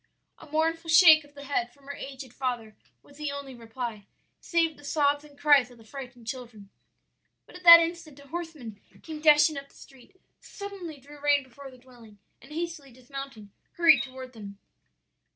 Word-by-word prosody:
"A 315 - -14
mournful 325 +2 -1
shake 320 -2 +8
of 290 0 -21
the 285 - -10
head 245 -4 -2
from 280 +1 -24
her 285 - -7
aged 265 -3 -9
father 240 -5 -4 0.3
was 285 - -19
the 300 -1 -4
only 280 -1 -7
reply, 230 -3 -7 0.3
save 330 -2 0
the 290 - -18
sobs 290 0 +1
and 290 -1 -17
cries 285 -4 +4
of 245 - -17
the 225 - -17
frightened 245 0 -10
children. 230 -5 -8 0.7
"But - - -17
at - - -16
that 335 0 +12
instant 330 -4 -4
a 280 - -16
horseman 305 -11 -7 0.2
came 315 -2 -8
dashing 305 0 +5
up 275 0 -8
the - - -25
street, 275 +8 -18 0.2
suddenly 385 -7 -9
drew 290 +2 -15
rein 290 -1 +3
before 270 +2 -13
their 255 - -16
dwelling, 240 -5 -17 0.2
and 270 - -16
hastily 325 -4 -5
dismounting, 255 -4 -10 0.2
hurried 330 -4 +5
toward 260 -1 -9
them. 200 -3 -10
280 Hz, 180 wpm, -27 LUFS, 250-310 Hz, 0.7 s, that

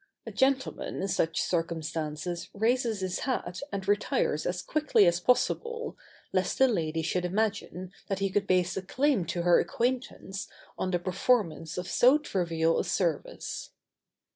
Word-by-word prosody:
A - - -6
gentleman 265 0 0
in - - 0
such 165 -3 0
circumstances 165 0 -2
raises 225 0 +1
his 185 -1 -2
hat 185 -9 -2
and 195 -1 -4
retires 205 - +1
as 180 0 -2
quickly 305 -9 +3
as 175 0 +3
possible, 465 - 0 0.4
lest - - +1
the 265 - +6
lady 165 -8 -1
should 180 +2 0
imagine 185 -2 -2 0.2
that 195 - -1
he 195 0 -1
could 200 +1 0
base 180 -1 +2
a 190 - -2
claim 250 - +1
to 170 +2 -2
her 175 0 +6
acquaintance 235 -2 -2 0.3
on 185 - -2
the 180 - +2
performance 180 -2 0
of 180 0 -3
so 255 +8 +5
trivial 165 - 0
a - - +1
service. 170 -6 -2
185 Hz, 150 wpm, -29 LUFS, 170-230 Hz, 0.4 s, the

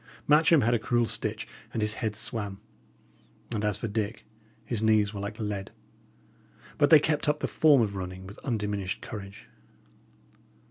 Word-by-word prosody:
Matcham 150 +1 +6
had 120 +1 +2
a 120 - +2
cruel 120 +1 +1
stitch, - - -3 0.2
and - - -3
his 105 0 +1
head 110 -3 -1
swam; 105 -2 -4 0.9
and 105 -1 -2
as 105 -1 +1
for 115 - -3
Dick, 110 +1 -3 0.4
his 115 -3 -1
knees 110 -2 +3
were 100 - -5
like 105 +3 -5
lead. 105 -3 -3 1.1
But 145 -1 +5
they 155 - +9
kept 150 0 0
up 150 - +2
the - - -1
form 145 -6 +5
of 100 -2 -2
running 95 0 -6
with 100 +3 -11
undiminished 105 -6 -3
courage. 100 -1 -8
105 Hz, 165 wpm, -28 LUFS, 100-120 Hz, 1.1 s, they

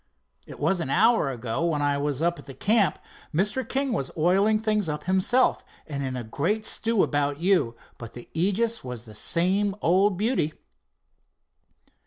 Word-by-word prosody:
"It - - -11
was 190 -2 +1
an 160 - -3
hour 220 - +3
ago, 125 +3 -3
when 155 -4 0
I 145 -1 +1
was 145 +1 -1
up 170 0 0
at - - -12
the 135 - -9
camp. 210 - +2 0.3
Mr. 200 +10 0
King 270 -1 0
was 135 - -2
oiling 195 +7 +3
things 215 -4 0
up 150 0 -4
himself, 190 +8 +2 0.2
and 140 -3 -5
in 130 -1 -3
a 120 - -4
great 170 - -1
stew 225 -2 +1
about 145 -1 0
you, 170 -10 +2 0.2
but 115 -1 -9
the 120 - -10
Aegis 205 +7 0
was 125 -3 -7
the 110 -3 -13
same 190 - 0
old 190 +2 +2
beauty." 210 - 0
175 Hz, 170 wpm, -25 LUFS, 140-210 Hz, 0.3 s, hour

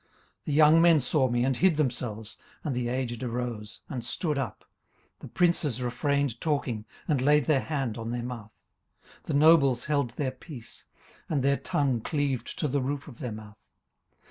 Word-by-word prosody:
18:029:008 - - -39 0.4
The 150 - -2
young 155 +2 +6
men 165 -2 +6
saw 130 0 +1
me, 120 +1 +1
and 130 -2 +1
hid 185 +1 +4
themselves: 120 -6 -3 0.3
and 140 -5 -2
the 125 -1 -1
aged 120 -2 -3
arose, 120 -3 -4
and 125 -5 -5
stood 150 +6 -2
up. 135 -6 -4 0.6
18:029:009 - - -53
The - - -9
princes 170 -8 +1
refrained 135 0 -1
talking, 130 -8 -1 0.2
and 145 -5 +1
laid 150 0 +4
their 145 -1 +3
hand 130 -7 -3
on 115 0 -5
their 120 0 -3
mouth. 115 -3 -8 0.6
18:029:010 - - -37
The 155 - -3
nobles 140 -5 +5
held 140 -4 +1
their 135 -3 -1
peace, 130 -2 -12 0.4
and 145 -5 0
their 140 0 +3
tongue 135 -5 0
cleaved 145 -2 -2
to 155 - 0
the 140 0 0
roof 140 +3 -3
of 125 -6 -12
their 125 -5 -4
mouth. 105 -1 -10
130 Hz, 185 wpm, -28 LUFS, 120-150 Hz, 0.6 s, young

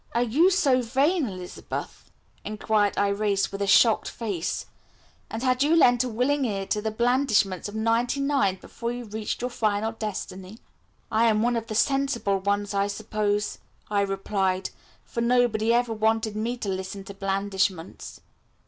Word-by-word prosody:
"Are 240 - +3
you 290 +11 +4
so 285 -9 +3
vain, 275 +6 +1
Elizabeth?" 185 -3 -7 0.3
inquired 210 -1 0
Irais 200 0 +1
with 195 - -5
a 200 - 0
shocked 220 +2 +5
face, 200 -8 -3 0.6
"and 225 +2 -5
had 255 0 +2
you 300 +4 +4
lent 245 -6 +5
a 255 - -3
willing 260 +5 +1
ear 200 -4 -2
to 210 +2 -1
the 220 - -1
blandishments 220 -5 +1
of 205 - -9
ninety 230 +4 +1
nine 275 -9 +1
before 235 +5 -6
you 245 0 -6
reached 215 +1 -4
your 250 +1 -2
final 215 -1 0
destiny?" 200 -3 -6 0.5
"I 225 +2 +3
am 215 -1 +2
one 240 0 +2
of 230 -1 -3
the 215 - -4
sensible 270 -6 +1
ones, 205 +1 -1
I 200 0 +1
suppose," 210 0 -2 0.3
I 205 -1 +2
replied, 195 -1 -1 0.3
"for 235 - -4
nobody 235 -2 +2
ever 240 -1 +2
wanted 220 0 0
me 230 +3 -2
to 215 -4 -4
listen 190 +1 -4
to 200 - -9
blandishments." 195 -2 -2
220 Hz, 160 wpm, -26 LUFS, 200-245 Hz, 0.6 s, shocked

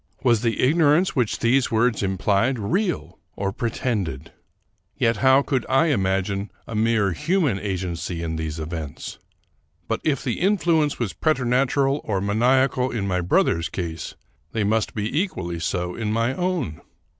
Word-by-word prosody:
Was 120 -4 +3
the 115 -2 0
ignorance 155 +5 +3
which 125 -5 +1
these 125 +3 +3
words 115 0 +2
implied 100 +6 +1
real 175 - -2 0.2
or 100 0 -2
pretended? 100 - -3 0.7
Yet 115 -1 +2
how 130 +5 +5
could 135 -3 0
I 135 +5 +3
imagine 95 -2 0 0.2
a - - -8
mere 110 -2 +2
human 155 - 0
agency 90 -3 -3
in 80 -1 -3
these 80 -1 -4
events? 80 -2 -6 0.7
But, - - -2
if 140 -4 0
the 125 -4 -2
influence 170 -6 +2
was 115 -6 -2
preternatural 135 0 +1
or 100 -3 -1
maniacal 125 +5 +2
in 105 -5 -2
my 90 -1 0
brother's 85 -2 +1
case, 80 -2 -5 0.4
they 110 -2 0
must 110 +2 0
be 105 +4 -2
equally 85 - -4
so 90 +1 -2
in 110 0 -3
my 115 +3 +1
own. 175 - -2
115 Hz, 145 wpm, -23 LUFS, 95-135 Hz, 0.7 s, how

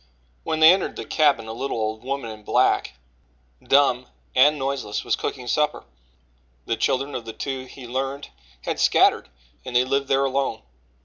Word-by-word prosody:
When 160 0 -2
they 160 +3 +9
entered 190 - -2
the - - -6
cabin, 140 -7 +2
a 110 - -5
little 130 +2 -3
old 110 +1 -3
woman 135 -3 -4
in 110 0 -11
black, - - +1 0.7
dumb 135 -3 +3 0.3
and 145 +4 +5
noiseless, 135 -6 -3
was - - +1
cooking 125 -2 -5
supper. 150 +5 0 0.8
The 115 - -1
children 135 +5 -1
of 120 - -5
the 115 - -7
two, 130 0 -5
he 130 0 -12
learned, 135 +3 -4 0.3
had - - -3
scattered, - - +3 0.3
and 125 - -7
they 125 +1 +4
lived 135 +1 0
there 135 0 +2
alone. 135 - -1
135 Hz, 170 wpm, -23 LUFS, 120-140 Hz, 0.8 s, they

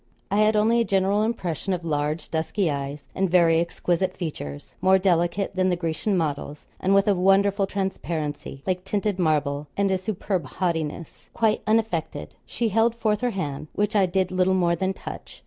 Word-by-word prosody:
I 200 - +2
had 215 +1 +4
only 225 +3 +3
a - - +3
general 195 0 +2
impression 195 -5 -2
of 175 -2 -4
large 150 0 -2
dusky 165 +2 0
eyes 140 +1 -5
and 190 -1 0
very 165 -2 +4
exquisite 175 +2 -1
features 75 - -6
more 190 0 +5
delicate 185 +1 +1
than 185 0 +2
the 180 - +2
Grecian 175 +4 -1
models, 150 -2 -3
and 195 +1 +2
with 195 +1 +4
a 205 - +5
wonderful 195 +2 +3
transparency, 160 -8 -4
like 185 -1 -1
tinted 200 0 -1
marble; 150 -3 0
and 200 -1 +2
a 190 - +1
superb 190 -2 -2
haughtiness, 165 -3 -3
quite 220 -2 +2
unaffected. 215 -8 -1
She 235 -2 -1
held 225 +3 +2
forth 215 -3 0
her 250 - +1
hand, 155 -8 -4
which 210 +1 -1
I 195 -2 +4
did 185 0 0
little 185 0 +2
more 175 -2 +2
than 190 +3 -1
touch. - - -9
185 Hz, 180 wpm, -24 LUFS, 165-200 Hz, -, more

